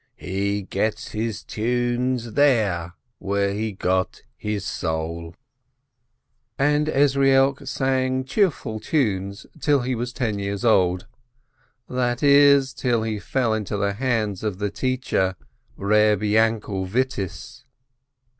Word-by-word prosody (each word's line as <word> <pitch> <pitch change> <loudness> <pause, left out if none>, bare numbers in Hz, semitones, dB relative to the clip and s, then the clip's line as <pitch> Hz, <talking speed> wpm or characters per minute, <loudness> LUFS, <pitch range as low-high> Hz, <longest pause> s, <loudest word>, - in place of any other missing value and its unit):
He 100 +2 -2
gets 105 +2 -2
his 110 -1 -3
tunes 120 +1 -1
there 105 -12 +2 0.3
where 100 0 0
he 110 +2 -2
got 95 -1 -1
his 105 -2 -4
soul." 80 0 -3 1.2
And 150 +2 +2
Ezrielk 135 -1 +3
sang 130 0 0
cheerful 135 - 0
tunes 100 -7 -1
till 145 -2 +2
he 130 +1 -1
was 120 +1 -3
ten 110 -4 -2
years 100 +2 -3
old, 90 -5 +3 0.8
that 125 0 -1
is, 140 -1 +6
till 120 -3 0
he 110 -2 -2
fell 120 +2 0
into 105 -1 -2
the 100 0 0
hands 110 -4 -1
of 105 -4 -2
the 105 0 -2
teacher 125 -7 -1 0.4
Reb 105 0 +3
Yainkel 105 -3 +1
Vittiss. 105 -3 -3
110 Hz, 115 wpm, -23 LUFS, 100-130 Hz, 1.2 s, is